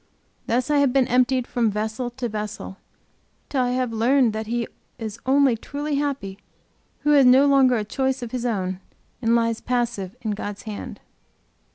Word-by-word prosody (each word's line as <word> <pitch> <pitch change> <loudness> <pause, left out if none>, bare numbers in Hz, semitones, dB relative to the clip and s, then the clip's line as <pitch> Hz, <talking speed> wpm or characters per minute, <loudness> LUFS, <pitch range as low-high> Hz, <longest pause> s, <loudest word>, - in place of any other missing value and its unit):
Thus 250 +5 0
I 295 - +4
have 280 -2 +3
been 265 -1 +3
emptied 255 0 +2
from 235 -3 0
vessel 220 +4 -3
to 245 0 -4
vessel, 210 -3 -5 0.7
til 270 - 0
I 250 - +1
have 250 -2 -1
learned 240 +1 +3
that 220 0 -4
he 235 +1 -1 0.6
only 275 -1 +4
is 225 - -5
truly 290 0 -3
happy 270 -10 -3 0.6
who 295 - +2
has 285 -2 +6
no 260 +3 +7
longer 270 -3 +5
a 220 - 0
choice 265 +3 -1
of 235 - -6
his 250 -2 -3
own, 190 -6 -2 0.4
and 230 -1 +3
lies 230 -1 +1
passive 235 -6 -2
in 220 - -1
God's 205 0 -5
hand. 215 -2 -7
240 Hz, 175 wpm, -23 LUFS, 220-265 Hz, 0.7 s, no